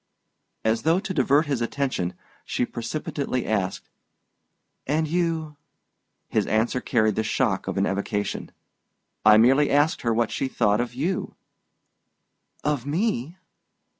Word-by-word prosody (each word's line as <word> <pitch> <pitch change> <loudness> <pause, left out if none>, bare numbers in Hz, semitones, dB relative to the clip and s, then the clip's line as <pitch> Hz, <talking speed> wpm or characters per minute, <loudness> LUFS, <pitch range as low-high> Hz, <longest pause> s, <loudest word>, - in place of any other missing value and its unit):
As 110 +1 +2
though 165 +3 +3
to 200 -1 -4
divert 145 +1 +3
his 140 -5 -1
attention, 115 -8 -1 0.3
she 125 - -1
precipitately 125 +2 -3
asked, 100 -3 -1 1.0
"And 155 +3 +1
you 160 -2 -1 0.3
?" - - -52
His - - 0
answer 110 +4 +1
carried 110 -3 +2
the 110 - -1
shock 105 - 0
of - - -3
an - - +2
evocation. 100 +1 -2 0.7
"I 110 0 +8
merely 135 +6 +5
asked 145 +3 +2
her 115 - 0
what 115 0 +1
she 135 - -1
thought 105 -3 +2
of 120 0 -5
you." 170 +8 -2 1.3
"Of 145 -4 0
me?" 160 - -1
130 Hz, 135 wpm, -25 LUFS, 110-150 Hz, 1.3 s, I